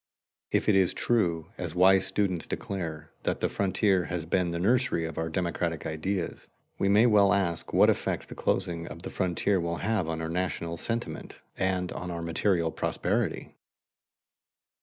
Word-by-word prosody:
If - - +1
it 105 - +5
is 95 -2 +3
true, 85 -9 0
as 90 -2 -4
wise 95 +1 +5
students 95 -3 -1
declare, 80 -6 -5
that - - -1
the - - +1
frontier 95 -2 +1
has 85 0 -3
been 90 +1 +1
the 85 - -2
nursery 105 -2 +2
of 80 - -5
our 80 0 -1
democratic 85 -1 -2
ideas, 85 +4 -3 0.3
we 100 - +2
may 105 +4 +6
well 105 -4 +5
ask 90 -5 0
what - - +5
effect - - 0
the - - -8
closing 85 -3 -1
of 80 +3 -9
the - - -6
frontier 95 +1 +1
will 85 0 -2
have 105 -6 +1
on 80 0 -2
our 80 - -3
national 85 -1 -2
sentiment 115 +6 -4
and 95 -1 -1
on 90 - -5
our 85 -1 -4
material 85 0 +1
prosperity. - - -1
90 Hz, 165 wpm, -28 LUFS, 85-95 Hz, 0.3 s, may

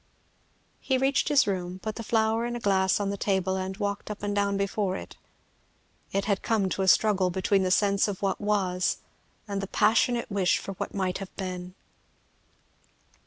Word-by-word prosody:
He 265 - 0
reached 270 +1 +1
his 290 -2 +5
room, 185 -2 -3
put 215 +3 -4
the 230 - -6
flower 225 0 +1
in 240 - -4
a - - -3
glass 190 -3 +2
on 200 -1 -1
the 200 - -4
table, 190 -1 0
and 190 0 -4
walked 200 -1 -3
up 210 -1 -6
and 205 0 -1
down 200 -1 +1
before 200 -1 -1
it. - - -9 1.0
It 195 0 0
had 200 -2 0
come 210 -4 +1
to 195 - -2
a 190 - 0
struggle 190 -1 +4
between 190 +2 +1
the 185 - +1
sense 200 +2 +3
of 200 -3 -4
what 195 - 0
was 190 -3 +1 0.5
and 200 -1 -3
the 195 - -4
passionate 225 +4 +2
wish 190 -3 +2
for - - -6
what - - -4
might 185 -2 -1
have 195 -1 -8
been. 180 -1 -5
200 Hz, 185 wpm, -27 LUFS, 190-210 Hz, 1.0 s, his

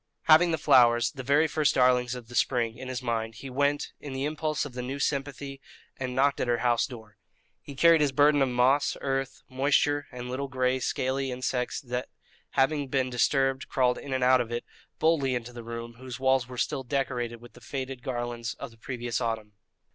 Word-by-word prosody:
Having 160 +2 +6
the 160 - +1
flowers, 120 -6 +5
the 135 - -7
very 140 +5 +3
first 155 -1 +1
darlings 125 -1 +3
of 120 -2 -9
the 120 - -12
spring, 115 -1 +1
in 130 - -8
his 130 -1 -4
hand, 115 -2 -2
he 130 +4 -8
went, 145 +2 0
in 145 -2 -7
the 135 +1 -2
impulse 155 0 -1
of 140 - -8
the 125 - -4
new 130 +3 -4
sympathy, 140 -1 -3 0.3
and 130 -1 -4
knocked 140 +1 +2
at - - -1
her 120 -1 +2
house 120 -1 +3
door. 110 -5 -12 0.4
He 140 - -10
carried 165 +3 +5
his 145 -2 +2
burden 145 +1 +4
of 135 - +3
moss, 130 +4 +2
earth, 135 -1 -3
moisture, 145 +2 +1
and 125 0 -7
little 130 +3 -3
gray 130 -1 0
scaly 130 +2 -1
insects 125 0 -2
that, 125 -1 -4 0.4
having 140 +1 +2
been 130 -1 0
disturbed, 135 +2 +1
crawled 125 -2 +2
in 140 - -8
and 130 -1 0
out 130 0 +5
of 120 -1 -5
it, 120 0 -3 0.3
boldly 150 -5 +2
into 120 0 -5
the 120 -1 -8
room, 115 0 -7
whose 130 -1 -7
walls 130 -2 +2
were 125 -1 -9
still 140 +2 -1
decorated 125 -3 -2
with 120 0 -15
the - - -16
faded 130 -2 -5
garlands 120 -3 -4
of - - -8
the 115 - -19
previous 120 0 -3
autumn. 115 -3 -3
130 Hz, 205 wpm, -28 LUFS, 120-140 Hz, 0.4 s, Having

